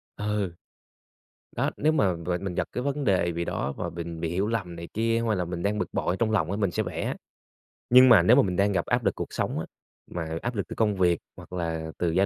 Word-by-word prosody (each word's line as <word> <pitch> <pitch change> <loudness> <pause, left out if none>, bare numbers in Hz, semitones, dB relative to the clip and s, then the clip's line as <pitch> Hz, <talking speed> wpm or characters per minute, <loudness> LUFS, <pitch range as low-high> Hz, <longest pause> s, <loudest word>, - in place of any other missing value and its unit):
Ừ. 105 -3 -2 1.0
Đó, - - 0
nếu 155 +2 +3
mà 100 - +2
về 85 +1 -2
mình 95 -1 -5
gặp - - 0
cái 125 - -3
vấn 140 +1 -1
đề 95 -6 +2
bì 85 +1 -3
đó 70 - -2
và 85 - -3
bình 85 -1 -6
bị 80 0 -2
hiểu 95 +5 0
lầm 100 -7 -2
này 85 0 -7
kia 115 +1 +1
hay 110 - +2
là 90 -2 -1
mình 85 0 -4
đang 105 +1 0
bực - - -3
bội 90 - 0
trong 115 -2 +1
lòng 95 -6 +1
á 100 - -1
mình 100 -4 +1
sẽ - - 0
vẽ. - - -3 0.7
Nhưng 130 +1 +8
mà 115 -7 +8
nếu 90 - +6
mà - - +7
mình 90 -3 -1
đang 100 +2 +3
gặp 95 - 0
áp - - +1
lực - - +2
cuộc - - -5
sống - - -1
á, - - -3 0.5
mà 80 -2 -3
áp 120 0 -3
lực 100 - -2
từ - - -7
công 105 -2 +2
việc 90 -3 +3 0.2
hoặc - - -13
là 80 -2 -3
từ 90 - +1
gia 95 +4 +3
95 Hz, 260 wpm, -27 LUFS, 85-110 Hz, 1.0 s, Nhưng